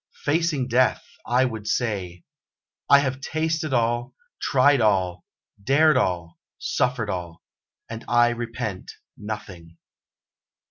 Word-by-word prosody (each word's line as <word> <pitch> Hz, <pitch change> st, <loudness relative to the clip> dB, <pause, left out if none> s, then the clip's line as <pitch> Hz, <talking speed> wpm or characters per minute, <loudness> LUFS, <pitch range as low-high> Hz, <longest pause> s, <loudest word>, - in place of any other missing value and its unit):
Facing 150 Hz, -3 st, +1 dB
Death, 125 Hz, +1 st, +2 dB, 0.2 s
I 125 Hz, +2 st, +3 dB
would 110 Hz, -4 st, -5 dB
say: 100 Hz, -7 st, -2 dB, 0.7 s
'I 140 Hz, -, +8 dB
have 135 Hz, -1 st, -3 dB
tasted 160 Hz, +1 st, -2 dB
all, 120 Hz, 0 st, 0 dB, 0.3 s
tried 140 Hz, 0 st, +4 dB
all, 95 Hz, -4 st, +1 dB, 0.4 s
dared 150 Hz, +6 st, +4 dB
all, 90 Hz, -8 st, -1 dB, 0.2 s
suffered 125 Hz, -3 st, -1 dB
all, 85 Hz, -2 st, -6 dB, 0.4 s
and 115 Hz, +1 st, -7 dB
I 120 Hz, 0 st, +4 dB
repent 115 Hz, -5 st, -5 dB, 0.2 s
nothing.' 95 Hz, -6 st, -8 dB
120 Hz, 105 wpm, -24 LUFS, 100-135 Hz, 0.7 s, I